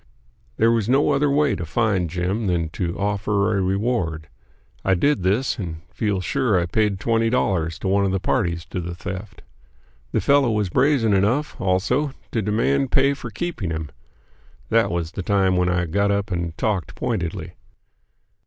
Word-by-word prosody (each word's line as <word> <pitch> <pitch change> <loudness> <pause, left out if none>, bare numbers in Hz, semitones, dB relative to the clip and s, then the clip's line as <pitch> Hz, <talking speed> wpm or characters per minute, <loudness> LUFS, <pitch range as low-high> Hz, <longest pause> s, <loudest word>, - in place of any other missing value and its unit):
There 115 +1 +4
was 115 -1 0
no 140 +3 +3
other 145 +1 +2
way 145 +1 +2
to 90 - -5
find 95 -1 0
Jim 90 +6 -1
than 85 -3 0
to 85 +1 -3
offer 100 +1 0
a 100 - +1
reward. 95 -5 -1 0.5
I 95 - +3
did 145 +6 +2
this, 105 +8 0
and 80 -4 -5
feel 105 -4 -1
sure 120 -3 +1
I 85 - 0
paid 105 +1 0
twenty 115 +1 +1
dollars 90 -9 0
to - - -4
one 100 +1 +2
of 95 - 0
the 95 - 0
parties 85 -6 -1
to 90 - -2
the 85 0 -5
theft. 95 +3 -7 0.7
The - - +1
fellow 140 -3 +3
was 105 -4 0
brazen 125 - +3
enough, 115 +10 +1
also, 115 +10 +1 0.2
to 115 - 0
demand 125 +6 +1
pay 140 +1 +4
for 120 -3 -7
keeping 110 - -4
him. 80 -2 -4 0.8
That 115 0 +3
was 85 -2 -2
the 95 - -5
time 95 -1 +2
when 90 0 +2
I 90 0 +1
got 100 +5 +1
up 100 +1 -1
and 85 -2 -3
talked 100 -5 -1
pointedly. 90 -9 -3
100 Hz, 175 wpm, -22 LUFS, 90-115 Hz, 0.8 s, There